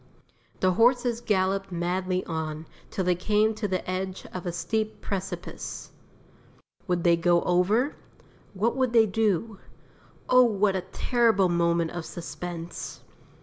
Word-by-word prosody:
The 185 - +4
horses 240 +3 +3
galloped 195 -2 0
madly 180 +1 -1
on, 160 -1 -4 0.2
till 190 - -2
they 180 - +4
came 210 +4 +2
to 215 -1 -3
the 185 -1 -2
edge 185 +1 -3
of 180 -1 -5
a - - 0
steep 215 +5 -2
precipice. 195 -1 -5 1.0
Would 175 -2 0
they 170 -1 +5
go 170 +1 +3
over? 200 +10 +2 0.6
What 225 +5 +1
would 260 -2 +1
they 225 -2 +6
do? 210 0 0 0.7
Oh, 255 0 +6
what 210 -5 +3
a 190 - 0
terrible 225 -7 +2
moment 170 -1 +1
of 175 -1 -5
suspense. 170 +1 -7
190 Hz, 135 wpm, -27 LUFS, 175-220 Hz, 1.0 s, they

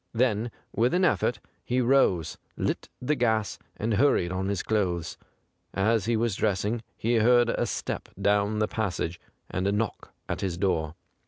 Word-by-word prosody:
Then 115 -1 +1 0.3
with 120 +8 +2
an 185 +1 +3
effort 120 -9 +1 0.2
he 125 +1 0
rose, 120 - +2 0.2
lit - - -2
the 125 +4 0
gas, 110 -6 0 0.2
and 110 +1 -1
hurried 100 -7 +3
on 95 +1 -2
his 100 -2 -1
clothes. 90 -6 -1 0.6
As 105 +1 +2
he 115 0 +1
was 115 -3 0
dressing, 105 +2 0 0.2
he 115 +1 +1
heard 120 +1 +5
a - - 0
step - - -4
down 105 +1 +2
the 105 0 +1
passage 90 -6 -2 0.3
and 95 +2 -1
a - - +2
knock 105 +2 -2 0.2
at - - -3
his 90 -3 -2
door. 85 -5 0
110 Hz, 165 wpm, -27 LUFS, 95-120 Hz, 0.6 s, heard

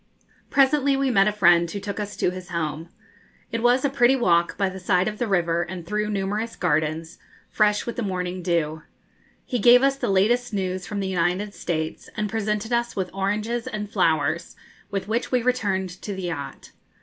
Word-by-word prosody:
Presently 275 0 +3
we 270 -1 +1
met 195 -3 +4
a - - +3
friend 175 -4 +4
who 200 - -4
took 200 +1 -5
us 205 0 -5
to 180 - +1
his 185 0 -9
home. 165 -1 -3 0.6
It 230 - -2
was 245 +3 +3
a - - +5
pretty 265 -1 +4
walk, 170 -9 +2
by 195 - +1
the 190 0 -6
side 180 +1 +2
of 215 0 -4
the 240 - 0
river 170 -4 +1
and 175 0 -6
through 210 +3 -1
numerous 210 +3 -2
gardens, 160 0 -1 0.3
fresh 210 -1 +2
with 235 - -5
the - - -1
morning 185 -3 -3
dew. 165 -3 -1 0.6
He 245 - -2
gave 245 +4 +7
us 275 0 +3
the - - -2
latest 220 +4 +2
news 185 -1 -2
from 205 -2 -3
the 195 - -2
United 185 +3 0
States, 160 -4 -4
and 210 -2 -2
presented 215 +1 -1
us 235 0 0
with 185 -2 -3
oranges 210 +5 -2
and 210 -1 -5
flowers, - - +1 0.3
with 195 -1 -3
which 230 +3 -1
we 250 -2 +2
returned 200 -7 0
to 205 - -5
the 190 - -6
yacht. 145 -6 -6
200 Hz, 195 wpm, -24 LUFS, 180-230 Hz, 0.6 s, gave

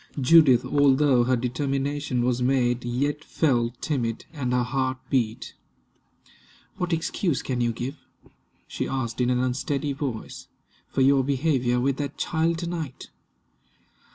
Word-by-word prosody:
Judith, 135 -3 +6
although 140 -3 +3
her 130 +1 +2
determination 135 +1 -1
was 125 0 0
made, 125 -1 +1
yet 140 +5 -1
felt 120 -7 0
timid, 120 -7 -2
and 135 -5 -3
her 125 0 +2
heart 130 +1 -1
beat. 120 -4 -1 1.2
"What 180 0 -2
excuse 165 -1 -1
can 125 -2 -2
you 120 -1 +1
give," 125 +5 -5 0.7
she - - -3
asked 125 -3 -3
in 125 - +2
an 125 - +2
unsteady 140 +3 -1
voice, 135 -5 -5 0.4
"for - - -1
your 135 0 +4
behavior 130 -3 +1
with 135 +2 0
that 140 -1 -4
child 165 +1 0
to 170 - -4
night?" 160 -6 -6
130 Hz, 135 wpm, -25 LUFS, 125-145 Hz, 1.2 s, Judith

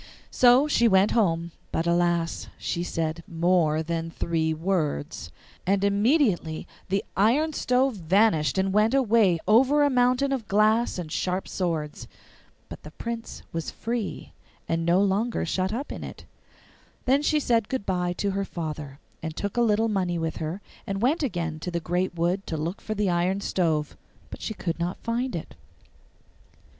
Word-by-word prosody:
So 250 +3 +5
she 235 -5 +3
went 195 0 +4
home, 170 -6 +1 0.2
but 165 - -1
alas! 170 -1 +1
she 170 - -3
said 165 -1 -2
MORE 165 -2 +2
THAN 165 0 -3
THREE 160 -1 -1
WORDS; 160 - -2 0.3
and 195 +1 +1
immediately 200 - +2 0.2
the 195 +1 0
iron 270 +11 +3
stove 255 -3 +1
vanished 180 -2 +2
and 190 0 +1
went 215 +5 +3
away 220 -8 +4
over 265 +7 +5
a 285 - +3
mountain 250 +2 +2
of 250 -6 -2
glass 215 +3 +3
and 170 -4 -5
sharp 185 +3 -1
swords. 160 -5 -3 0.6
But - - -10
the 150 - -10
Prince 230 +7 -6
was 165 -1 -3
free, 230 -2 -4 0.3
and 165 0 0
was 165 - -3
no 175 +2 +4
longer 205 +3 0
shut 185 +3 -1
up 255 +6 -4
in - - -6
it. - - -9 0.8
Then 270 +3 +3
she 300 +1 +2
said 230 -6 +1
good 260 -6 -2
bye 180 -1 0
to 200 +2 -1
her 195 +1 -1
father, 155 -6 -6 0.2
and 160 -1 -5
took 200 -1 -3
a 240 - +2
little 225 -1 +3
money 185 -5 0
with 165 -1 -2
her, 160 +5 -4 0.3
and 195 +2 -2
went 295 +7 +2
again 175 - -2
into 155 +3 -6
the 170 -1 -2
great 175 +2 -1
wood 175 +4 0
to 160 - -3
look 165 +6 -4
for 215 - -4
the 205 -3 +1
iron 180 +3 +1
stove; 160 -6 0 0.4
but - - -8
she 220 - -4
could 170 -3 -3
not 175 +2 -2
find 240 +1 -1
it. 165 - -6
190 Hz, 170 wpm, -26 LUFS, 170-230 Hz, 0.8 s, So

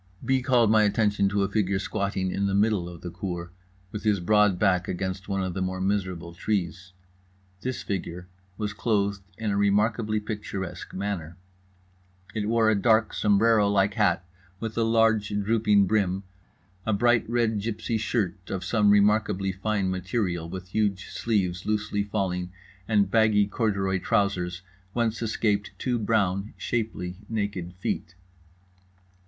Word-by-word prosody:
B. 130 +1 +2
called 125 -4 +3
my 110 -1 +5
attention 105 -1 +2
to 100 0 +1
a - - +1
figure 100 -2 0
squatting 100 -1 -2
in 100 +1 0
the 100 - 0
middle 100 -4 +2
of 85 -2 -11
the 90 - -6
cour 85 -1 -5 0.4
with 105 - -5
his 105 -2 +2
broad 105 +1 +3
back 90 -2 +2
against 95 +2 -4
one 95 -1 0
of 95 -1 -3
the 95 - -3
more 95 0 -2
miserable 95 -3 -2
trees. 90 -1 -3 0.7
This 130 +1 -3
figure 90 -2 -4 0.3
was 105 -1 -3
clothed 100 -3 0 0.2
in 110 -2 -2
a - - 0
remarkably 105 +2 +2
picturesque 105 -3 -5
manner: 95 -4 -4 1.0
it 105 -1 -2
wore 115 -1 +4
a - - +4
dark 110 +1 +3
sombrero 105 0 +3
like 100 0 +2
hat 95 -6 +2 0.3
with 110 0 -4
a 115 - +1
large 115 -2 +3
drooping 105 0 +3
brim, 95 -1 +1 0.6
a 110 - 0
bright 115 +2 +3
red 115 -3 +1
gipsy 110 +1 -2
shirt 100 -5 -2
of 95 -1 -3
some 105 0 +3
remarkably 100 -1 +3
fine 95 0 -1
material 90 -2 -2
with 90 +1 -7
huge 100 -2 -1
sleeves 95 -6 -1
loosely 105 -1 0
falling, 95 -3 -2 0.4
and 100 -3 +2
baggy 110 -2 +4
corduroy 100 -3 0
trousers 90 -5 0 0.3
whence 115 -2 0
escaped 105 -3 0
two 125 -2 -1
brown, 105 -2 0
shapely, 105 -6 -3
naked 100 -5 -3
feet. 85 -1 -3
100 Hz, 150 wpm, -26 LUFS, 95-110 Hz, 1.0 s, my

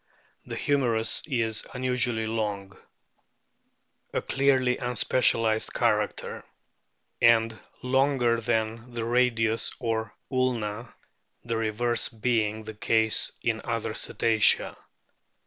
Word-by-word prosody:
The - - -5
humerus 120 -6 +1
is 115 -6 -1
unusually 125 -3 0
long 105 -3 -3 1.4
(a - - 0
clearly 130 -2 +1
unspecialised 115 -2 +1
character), 105 -3 -1 0.8
and 115 -1 +4 0.3
longer 125 -3 +2
than 115 +1 -2
the 115 -1 -3
radius 115 -2 +1
or 115 -2 -2 0.2
ulna, 120 -3 -1 0.5
the 115 -1 -2
reverse 115 +1 0
being 110 -2 -1
the 110 0 -7
case 110 +1 +2
in - - -1
other - - -3
Cetacea. 110 -2 +2
115 Hz, 95 wpm, -26 LUFS, 110-125 Hz, 1.4 s, and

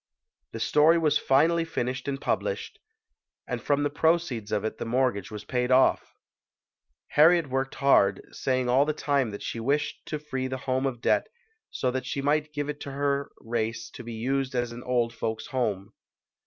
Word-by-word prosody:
The - - -5
story 155 +3 +4
was 155 -3 +2
finally 165 +5 +3
finished 130 -5 -3
and 135 -1 -2
published, - - -2 0.7
and - - -4
from 145 0 +1
the 145 - 0
proceeds 150 -8 0
of 105 0 0
it 110 - -4
the - - -2
mortgage 120 -5 0
was 105 -1 -8
paid 125 -1 -1
off. 130 +1 +3 0.9
Harriet 165 +2 +5
worked 135 0 -1
hard, 100 -9 +4
saying 130 -1 -1
all 130 +3 +4
the 155 +1 -1
time 140 -5 0
that 100 - -7
she 115 - -4
wished 145 +6 -1
to 155 - -2
free 135 -3 -4
the 130 0 -3
home 130 0 +1
of 120 -3 -5
debt - - +2 0.4
so 125 - -1
that 130 0 -3
she 140 - -3
might 150 +2 +1
give 145 -1 -3
it 150 0 -4
to 140 - -6
her 140 0 -1
race 115 -1 -3
to - - -9
be 120 0 -7
used 130 +3 -1
as 120 -1 -1
an 120 +1 -8
Old 120 -2 0
Folks' 110 -1 -3
Home. 105 -5 -1
130 Hz, 185 wpm, -27 LUFS, 120-145 Hz, 0.9 s, Harriet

